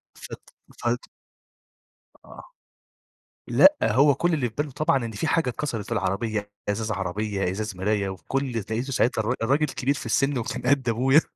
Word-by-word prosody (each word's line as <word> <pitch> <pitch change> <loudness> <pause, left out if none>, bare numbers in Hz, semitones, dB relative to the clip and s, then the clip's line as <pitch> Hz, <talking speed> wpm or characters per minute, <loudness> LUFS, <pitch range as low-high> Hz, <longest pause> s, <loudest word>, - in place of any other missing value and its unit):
فت - - -11 0.3
فت - - -1 1.2
آه. - - -12 1.0
لأ، 295 - +6
هو 140 +1 +4
كل 175 0 +1
اللي 135 -6 0
في 110 - -25
باله 145 0 -1
طبعًا 135 -2 +1
إن 115 - -5
في 105 - -3
حاجة 160 -6 +2
اتكسرت 120 -6 -3
في - - -12
العربية، 105 0 -1 0.2
إزاز 110 +1 -1
عربية، 100 0 -2
إزاز 105 +1 -4
مراية 100 +1 0
وفي 95 -2 -8
كل 135 - 0
اللي 120 -4 -2
لقيته 110 +6 -3
ساعتها 125 -1 +2
الرا 110 +3 0
الراجل 140 +6 +2
كبير 135 -1 -1
في 140 - -7
السن 135 0 +1
وكان 115 - -3
قد 130 -1 +2
أبويا 130 +6 +4
115 Hz, 175 wpm, -25 LUFS, 105-135 Hz, 1.2 s, لأ